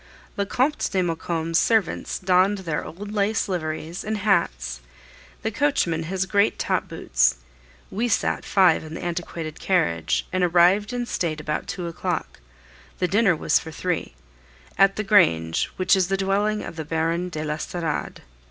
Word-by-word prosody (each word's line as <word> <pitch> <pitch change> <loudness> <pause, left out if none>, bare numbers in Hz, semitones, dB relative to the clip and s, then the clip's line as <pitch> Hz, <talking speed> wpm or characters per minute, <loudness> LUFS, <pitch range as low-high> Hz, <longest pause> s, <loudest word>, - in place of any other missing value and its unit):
The 200 0 -1
Comte 265 +8 0
de 190 -2 +1
Maucombe's 165 -1 -1
servants 220 -7 +1
donned 185 +2 +3
their 155 -3 -2
old 205 +5 -8
laced 210 +1 +1
liveries 165 -1 -4
and 215 +1 -2
hats, 65 - 0 0.6
the 220 - -1
coachman 205 - +1
his 190 +2 -1
great 200 +2 +2
top - - -1
boots; - - +1 0.6
we 225 +5 -1
sat 225 - 0
five 185 -6 +4
in 155 0 -8
the - - -7
antiquated 170 -2 -4
carriage, 85 - +1
and 185 0 +1
arrived 180 +5 +4
in 245 -1 -2
state 165 -8 -2
about 150 0 -3
two 180 -1 -4
o'clock 170 -1 -3 0.6
the 180 - +1
dinner 200 0 +3
was - - +2
for 160 - -9
three 165 - -3 0.6
at 195 0 +4
the 215 - -2
grange, 80 - +3
which 185 - +4
is 185 -2 +2
the 195 +1 0
dwelling 205 +2 0
of 165 - -8
the 160 - -3
Baron 165 +3 -1
de 155 -3 -4
l'Estorade. 155 +1 -3
180 Hz, 160 wpm, -24 LUFS, 160-200 Hz, 0.6 s, five